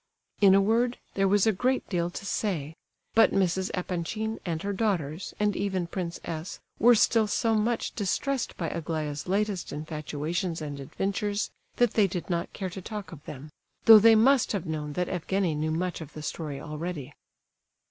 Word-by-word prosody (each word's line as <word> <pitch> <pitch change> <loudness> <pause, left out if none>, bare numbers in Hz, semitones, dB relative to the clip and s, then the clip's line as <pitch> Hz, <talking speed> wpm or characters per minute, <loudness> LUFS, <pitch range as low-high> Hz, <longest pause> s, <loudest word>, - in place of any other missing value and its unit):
In 195 -2 +7
a 195 - +6
word, 235 +4 +2 0.2
there 195 0 +2
was 205 +1 +4
a 220 - +5
great 250 +6 0
deal 175 -3 0
to 190 - -7
say; 165 -8 -2 0.4
but 225 0 +5
Mrs. 190 0 +1
Epanchin, 190 +5 -3
and 165 -4 -3
her 200 0 -1
daughters, 185 -6 -2
and 210 -1 +1
even 190 -3 -1
Prince 170 0 -4
S., 165 +3 -5 0.2
were 240 +1 +7
still 220 0 +4
so 225 +2 +1
much 225 +2 0
distressed 245 +6 -1
by 170 - -2
Aglaya's 155 -3 -3
latest 200 0 -1
infatuations 155 +3 -3
and 145 -2 -5
adventures, 200 +8 -2 0.2
that 245 -3 +3
they 210 -3 +4
did 180 0 -5
not 170 0 -1
care 190 -2 -5
to 190 - -7
talk 210 0 -6
of 155 -4 -11
them, 150 +2 -9 0.3
though 225 -2 +11
they 225 +1 +7
must 250 +3 +4
have 195 -5 -2
known 150 -2 -4
that 180 +3 -1
Evgenie 180 0 -1
knew 155 +1 -1
much 175 +2 -2
of 155 - -9
the 155 - -8
story 150 -3 -4
already. 150 -2 -5
185 Hz, 180 wpm, -28 LUFS, 160-210 Hz, 0.4 s, though